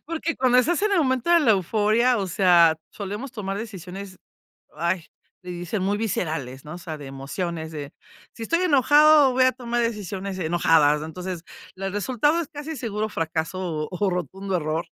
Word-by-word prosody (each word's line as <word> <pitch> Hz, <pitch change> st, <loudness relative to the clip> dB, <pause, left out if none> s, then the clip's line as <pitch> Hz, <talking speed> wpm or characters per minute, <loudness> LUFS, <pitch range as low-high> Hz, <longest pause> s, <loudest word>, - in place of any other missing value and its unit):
porque 330 Hz, +1 st, -3 dB
cuando 250 Hz, -1 st, +4 dB
estás 340 Hz, +9 st, +2 dB
en 425 Hz, -1 st, +2 dB
el 390 Hz, -, +3 dB
momento 260 Hz, 0 st, +1 dB
de 340 Hz, -1 st, +6 dB
la 240 Hz, -8 st, +5 dB
euforia, 215 Hz, +5 st, +2 dB
o 195 Hz, -, -1 dB
sea, 175 Hz, -3 st, +5 dB, 0.2 s
solemos 205 Hz, +6 st, -6 dB
tomar 200 Hz, -5 st, -4 dB
decisiones, 195 Hz, -3 st, -8 dB, 0.6 s
ay, 170 Hz, +1 st, -1 dB, 0.4 s
le 180 Hz, -, -7 dB
dicen 175 Hz, +4 st, -4 dB
muy 200 Hz, +2 st, +1 dB
viscerales, 155 Hz, -, -3 dB
¿no?, 150 Hz, -, -8 dB
o -, -, -7 dB
sea, 160 Hz, -3 st, -7 dB
de 145 Hz, -, -9 dB
emociones, 160 Hz, +4 st, -5 dB
de, 145 Hz, -2 st, -7 dB, 0.4 s
si 230 Hz, -, -9 dB
estoy 335 Hz, +9 st, +1 dB
enojado, 295 Hz, -1 st, +6 dB
voy 255 Hz, +1 st, +4 dB
a 255 Hz, -, +4 dB
tomar 240 Hz, -1 st, -2 dB
decisiones 200 Hz, -4 st, -3 dB
enojadas. 160 Hz, -3 st, +3 dB
Entonces, 175 Hz, +2 st, -6 dB, 0.3 s
las 195 Hz, 0 st, -4 dB
resultado 255 Hz, -, +1 dB
es 325 Hz, -, -5 dB
casi 300 Hz, +1 st, -6 dB
seguro 215 Hz, -4 st, -3 dB
fracaso 165 Hz, -2 st, -3 dB
o 190 Hz, +2 st, 0 dB
rotundo 185 Hz, +2 st, -3 dB
error, 160 Hz, +1 st, -2 dB
195 Hz, 170 wpm, -24 LUFS, 170-250 Hz, 0.6 s, de